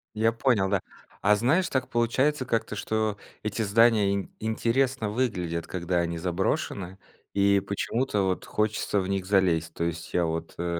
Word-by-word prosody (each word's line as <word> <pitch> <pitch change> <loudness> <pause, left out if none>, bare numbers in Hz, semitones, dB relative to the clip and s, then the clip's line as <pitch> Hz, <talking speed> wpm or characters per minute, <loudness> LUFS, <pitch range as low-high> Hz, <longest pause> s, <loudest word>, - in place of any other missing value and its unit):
Я 115 +1 +3
понял, 115 -4 +2
да. 100 -2 +1 0.4
А 105 +1 +5
знаешь, 150 - +2
так 130 -1 -1
получается 130 +4 +1
как-то, 115 -3 -1
что 110 -1 -1 0.3
эти 105 +1 -1
здания 105 -1 +4
ин 100 - -4
интересно 115 +2 0
выглядят, 95 -8 -2
когда 90 0 -2
они 85 -1 -1
заброшены, 90 +1 -2 0.4
и 100 0 +4
почему-то 105 +3 -1
вот 95 -1 -1
хочется 105 -1 0
в 95 - -4
них 95 -1 -1
залезть. 90 -5 +2
То 85 - -3
есть 85 -1 -4
я 90 - +2
вот, 80 0 -4
э 85 0 -2
100 Hz, 160 wpm, -27 LUFS, 90-115 Hz, 0.4 s, А